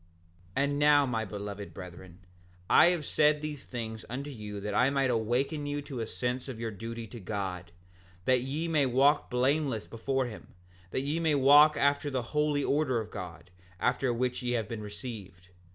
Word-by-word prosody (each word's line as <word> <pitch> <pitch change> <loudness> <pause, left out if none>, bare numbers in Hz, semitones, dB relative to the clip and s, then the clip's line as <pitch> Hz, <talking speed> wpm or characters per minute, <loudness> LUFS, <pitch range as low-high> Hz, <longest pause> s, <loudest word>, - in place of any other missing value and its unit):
7:22 140 - +3
And 145 0 0
now 145 -1 +5
my 115 -4 -1
beloved 100 0 -7
brethren, 90 0 -11 0.4
I - - +7
have 175 -4 +1
said 150 0 +3
these 150 -3 -5
things 110 -3 -5
unto 140 +4 -5
you 105 -4 -7
that 105 +1 -4
I 125 +5 +4
might 135 -2 +1
awaken 125 +6 0
you 145 0 -3
to 135 -3 -6
a 115 - -3
sense 125 +2 -3
of 125 -4 -6
your 115 -1 -3
duty 115 +2 -6
to 120 +2 -10
God, 95 -3 -4 0.5
that 130 -1 +3
ye 145 +6 -3
may 150 -4 +2
walk 135 +4 +3
blameless 130 -2 +1
before 130 +3 -1
him, 115 -6 -10 0.3
that 130 - -1
ye 145 +4 -1
may 160 -3 +2
walk 145 +2 +7
after 140 +1 +2
the 130 -3 -2
holy 150 -1 +1
order 140 -5 +1
of 110 - -6
God, 90 -2 -8 0.3
after 130 -2 +1
which 125 +1 -1
ye 125 -1 -1
have 115 -3 -1
been 115 -1 -5
received. 105 -4 -8
125 Hz, 185 wpm, -30 LUFS, 110-145 Hz, 0.5 s, I